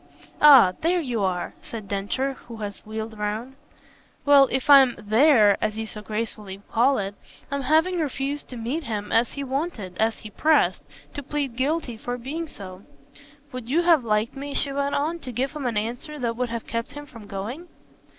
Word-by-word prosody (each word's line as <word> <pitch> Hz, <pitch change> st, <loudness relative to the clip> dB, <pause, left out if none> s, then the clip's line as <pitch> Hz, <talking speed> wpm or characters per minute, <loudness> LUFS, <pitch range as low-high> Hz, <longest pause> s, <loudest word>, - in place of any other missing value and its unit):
"Ah 270 Hz, -11 st, +8 dB
there 350 Hz, +3 st, +2 dB
you 245 Hz, -9 st, -2 dB
are!" 185 Hz, -2 st, -1 dB
said 230 Hz, -10 st, -8 dB
Densher 205 Hz, +8 st, -1 dB
who 240 Hz, -3 st, -12 dB
had 205 Hz, -2 st, -4 dB
wheeled 220 Hz, 0 st, -7 dB
round. 215 Hz, +5 st, -3 dB, 0.7 s
"Well, 280 Hz, -2 st, +7 dB
if 265 Hz, +3 st, -1 dB
I'm 270 Hz, -4 st, +7 dB
'there,' 215 Hz, -1 st, +4 dB
as 215 Hz, 0 st, -1 dB
you 220 Hz, -, -3 dB
so 215 Hz, -1 st, -8 dB
gracefully 210 Hz, -2 st, -4 dB
call 260 Hz, +4 st, +3 dB
it, 195 Hz, 0 st, -3 dB, 0.4 s
by 280 Hz, 0 st, -1 dB
having 320 Hz, +6 st, +2 dB
refused 285 Hz, -1 st, -3 dB
to 250 Hz, -, -7 dB
meet 260 Hz, +8 st, -3 dB
him 210 Hz, -3 st, -4 dB
as 230 Hz, +1 st, +2 dB
he 280 Hz, -, -4 dB
wanted 265 Hz, -, -3 dB
as 225 Hz, 0 st, +1 dB
he 215 Hz, -, -10 dB
pressed 310 Hz, +8 st, +2 dB, 0.3 s
I 285 Hz, -, -3 dB
plead 280 Hz, -3 st, -3 dB
guilty 265 Hz, -3 st, -1 dB
to 245 Hz, +2 st, -4 dB
being 300 Hz, +7 st, -5 dB
so. 185 Hz, -8 st, -10 dB, 0.7 s
Would 250 Hz, -2 st, -7 dB
you 330 Hz, +6 st, +2 dB
have 335 Hz, -6 st, +5 dB
liked 215 Hz, +1 st, 0 dB
me," 280 Hz, +1 st, -6 dB
she 280 Hz, -, 0 dB
went 280 Hz, 0 st, -1 dB
on, 320 Hz, +4 st, -1 dB
"to 255 Hz, -, -7 dB
give 255 Hz, +3 st, -1 dB
him 300 Hz, -4 st, -4 dB
an 230 Hz, -3 st, -1 dB
answer 245 Hz, +8 st, -4 dB
that 235 Hz, -4 st, -2 dB
would 250 Hz, 0 st, -2 dB
have 230 Hz, -1 st, -5 dB
kept 230 Hz, 0 st, -4 dB
him 290 Hz, 0 st, -8 dB
from 230 Hz, -7 st, -13 dB
going?" 225 Hz, -, -6 dB
245 Hz, 190 wpm, -24 LUFS, 220-285 Hz, 0.7 s, Ah